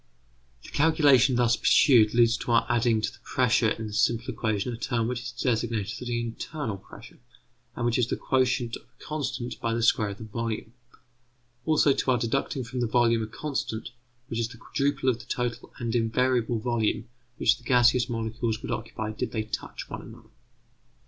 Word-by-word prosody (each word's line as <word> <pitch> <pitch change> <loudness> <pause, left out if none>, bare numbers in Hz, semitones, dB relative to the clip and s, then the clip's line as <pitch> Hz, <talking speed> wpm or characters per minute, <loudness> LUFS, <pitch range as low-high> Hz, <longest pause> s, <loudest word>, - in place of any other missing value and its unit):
The - - -11
calculation 145 -5 +4
thus 120 -1 +3
pursued 115 -6 +5
leads 120 -1 +5
to - - -4
our 115 - +4
adding 120 -2 +2
to - - -1
the - - -17
pressure 120 -2 +2
in 110 +1 -3
the 105 - -7
simple 115 +3 +1
equation 110 +1 -1
a - - -6
term 115 -1 -1
which 125 0 -3
is 120 0 -6
designated 115 -1 -2
the 120 -1 -1
internal 120 0 -4
pressure, 105 +4 -14 0.6
and 120 - -2
which 120 +1 +1
is 120 - +2
the - - -1
quotient 130 -3 0
of - - -10
a - - -22
constant 140 -5 -4
by 115 -2 0
the 115 - -1
square 110 -2 +3
of 100 - -7
the - - -9
volume; 110 0 -4 0.9
also 150 -3 +4
to 135 - -1
our 125 - +4
deducting 130 +3 -1
from 125 +1 -5
the 120 - +1
volume 115 0 +3
a 110 - -3
constant 115 -4 -4 0.3
which 115 -2 -4
is 115 - 0
the 115 0 -13
quadruple 140 +2 -1
of 120 -3 +2
the 120 - -11
total 120 -1 -3
and 115 -1 -3
invariable 120 0 +1
volume 115 -1 -1 0.3
which - - +3
the - - -20
gaseous 120 0 +4
molecules 115 -1 -2
would - - -4
occupy 110 -1 -4
did 110 - -4
they 110 -2 -1
touch 110 - -6
one - - -6
another. - - -14
120 Hz, 190 wpm, -27 LUFS, 115-125 Hz, 0.9 s, pursued